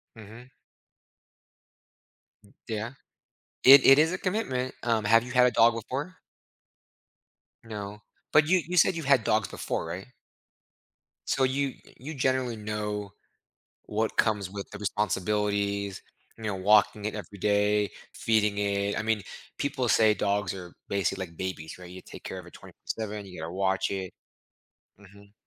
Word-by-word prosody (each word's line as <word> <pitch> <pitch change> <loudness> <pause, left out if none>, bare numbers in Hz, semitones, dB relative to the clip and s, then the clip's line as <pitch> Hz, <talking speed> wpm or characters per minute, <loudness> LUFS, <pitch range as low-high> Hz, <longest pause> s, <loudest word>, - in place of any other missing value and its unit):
Mhm. 115 +4 -12 1.9
M 100 - -22
Yeah. 110 +3 -4 0.7
It 135 +1 +10
it 135 +1 +9
is 160 +3 +4
a 180 - -2
commitment, 130 - -2
um, 115 -3 +1
have 115 +2 +5
you 125 - -7
had 125 -1 +6
a - - +3
dog 115 0 +5
before? 140 - -5 1.5
No. 105 -2 -7 0.3
But 150 0 +5
you 185 - +5
you 180 - -4
said 175 - +5
you've 165 -2 -4
had 135 -4 +4
dogs 110 -3 +1
before, - - -3
right? 90 +4 -6 1.2
So, 135 - +1
you 135 +2 +1 0.2
y - - -18
you 150 +5 -7
generally 130 -2 0
know 105 -1 -4 0.7
what 110 +1 -2
comes 105 -4 +1
with 100 -1 -7
the - - -7
responsibilities, 100 -1 -1 0.4
you 115 - -11
know, 105 -2 -2
walking 105 +2 +3
it 110 - -2
every 105 -1 -8
day, 105 +1 +2 0.2
feeding 105 -2 +1
it. 100 0 0
I - - 0
mean, 110 -2 0 0.3
people 140 -3 -1
say 110 -1 +5
dogs 100 -2 0
are 90 -3 -9
basically 95 -1 -1
like 85 -2 -18
babies, 90 -4 -5
right? 90 -1 -10
You 90 +1 -10
take - - -12
care - - -6
of - - -11
it - - -15
24/7, 105 -2 -6
you 90 -4 -10
gotta 80 +1 -5
watch 95 0 0
it 95 -2 -4 0.9
mhm. 100 0 -17
105 Hz, 155 wpm, -28 LUFS, 100-125 Hz, 1.9 s, It